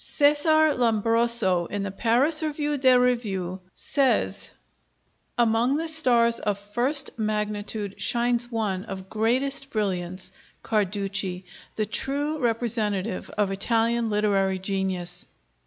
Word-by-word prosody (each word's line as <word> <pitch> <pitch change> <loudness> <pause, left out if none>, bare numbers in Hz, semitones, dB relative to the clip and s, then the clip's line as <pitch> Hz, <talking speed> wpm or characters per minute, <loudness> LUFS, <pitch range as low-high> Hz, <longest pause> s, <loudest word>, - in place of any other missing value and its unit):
Cesar 300 +1 +3
Lombroso, 230 -6 +2
in 205 -1 -4
the 200 - -4
Paris 250 - +2
Revue 295 -1 -1
des 260 -2 +4
Revues, 205 -8 0
says: 275 +4 0 0.9
"Among 240 +3 +2
the 325 +1 -2
stars 240 -7 +3
of 205 -2 -1
first 240 +7 0
magnitude 210 -1 -3
shines 240 0 +1
one 205 -5 -2
of 190 -1 -8
greatest 265 +5 0
brilliance, 185 -4 -3 0.3
Carducci, 195 -3 -1 0.3
the 215 - 0
true 290 +7 -2
representative 225 -5 -1
of 205 -2 +1
Italian 230 +3 +1
literary 200 -2 +1
genius." 185 -2 -3
225 Hz, 105 wpm, -25 LUFS, 195-250 Hz, 0.9 s, des